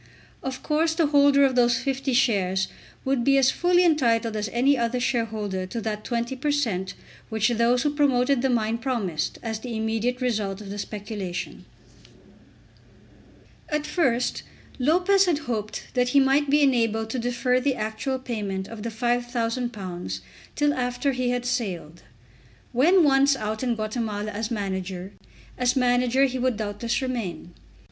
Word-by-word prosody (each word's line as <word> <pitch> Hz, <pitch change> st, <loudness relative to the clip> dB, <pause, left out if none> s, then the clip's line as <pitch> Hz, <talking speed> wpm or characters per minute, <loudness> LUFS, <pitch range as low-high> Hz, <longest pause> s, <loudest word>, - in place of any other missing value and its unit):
Of 265 Hz, -1 st, -5 dB
course 320 Hz, +1 st, +1 dB
the 330 Hz, -1 st, +3 dB
holder 285 Hz, -1 st, +5 dB
of 265 Hz, -2 st, +1 dB
these 240 Hz, -1 st, +4 dB
50 270 Hz, +1 st, -2 dB
shares 195 Hz, -7 st, +2 dB, 0.4 s
would 265 Hz, -2 st, +1 dB
be 275 Hz, +2 st, +4 dB
as 265 Hz, -1 st, +5 dB
fully 355 Hz, 0 st, +3 dB
entitled 235 Hz, -8 st, +2 dB
as 210 Hz, -1 st, -2 dB
any 260 Hz, +6 st, +3 dB
other 240 Hz, 0 st, 0 dB
shareholder 215 Hz, -6 st, -2 dB
to 230 Hz, +5 st, -4 dB
that 215 Hz, -1 st, -4 dB
20 235 Hz, +1 st, -2 dB
per 295 Hz, +4 st, -1 dB
cent. 215 Hz, -11 st, -1 dB, 0.3 s
which 220 Hz, +1 st, +1 dB
those 240 Hz, +1 st, +2 dB
who 295 Hz, -1 st, 0 dB
promoted 275 Hz, -3 st, +2 dB
the 265 Hz, -, +1 dB
mine 230 Hz, -1 st, 0 dB
promised 220 Hz, -, -2 dB
as 220 Hz, -2 st, -3 dB
the 235 Hz, -1 st, -5 dB
immediate 225 Hz, +3 st, -1 dB
result 215 Hz, -6 st, -1 dB
of 200 Hz, -2 st, -8 dB
the 205 Hz, -, -5 dB
speculation. 205 Hz, -4 st, -5 dB, 2.0 s
At 300 Hz, -1 st, -1 dB
first 260 Hz, -7 st, 0 dB, 0.4 s
Lopez 360 Hz, +8 st, +4 dB
had 335 Hz, -4 st, +2 dB
hoped 225 Hz, -7 st, -5 dB
that 250 Hz, -1 st, +2 dB
he 280 Hz, -, +5 dB
might 275 Hz, +2 st, +3 dB
be 295 Hz, +1 st, +4 dB
enabled 225 Hz, -4 st, +1 dB
to 255 Hz, -, -2 dB
defer 245 Hz, +1 st, +1 dB
the 265 Hz, 0 st, 0 dB
actual 220 Hz, +5 st, -2 dB
payment 205 Hz, -7 st, -4 dB
of 230 Hz, -2 st, -9 dB
the 230 Hz, -, -3 dB
£5000 230 Hz, -, -2 dB, 0.4 s
till 295 Hz, 0 st, +2 dB
after 250 Hz, +2 st, -1 dB
he 255 Hz, -1 st, -1 dB
had 245 Hz, 0 st, -1 dB
sailed. 185 Hz, -, -3 dB, 0.7 s
When 330 Hz, +9 st, +5 dB
once 275 Hz, -1 st, +4 dB
out 215 Hz, -2 st, -3 dB
in 245 Hz, -2 st, 0 dB
Guatemala 215 Hz, -1 st, -3 dB
as 215 Hz, +2 st, -3 dB
manager, 190 Hz, -3 st, -4 dB, 0.5 s
as 250 Hz, 0 st, +2 dB
manager 250 Hz, +1 st, +3 dB
he 260 Hz, -1 st, -2 dB
would 250 Hz, -3 st, 0 dB
doubtless 220 Hz, +4 st, -2 dB
remain. 225 Hz, -9 st, -4 dB
240 Hz, 155 wpm, -25 LUFS, 215-265 Hz, 2.0 s, holder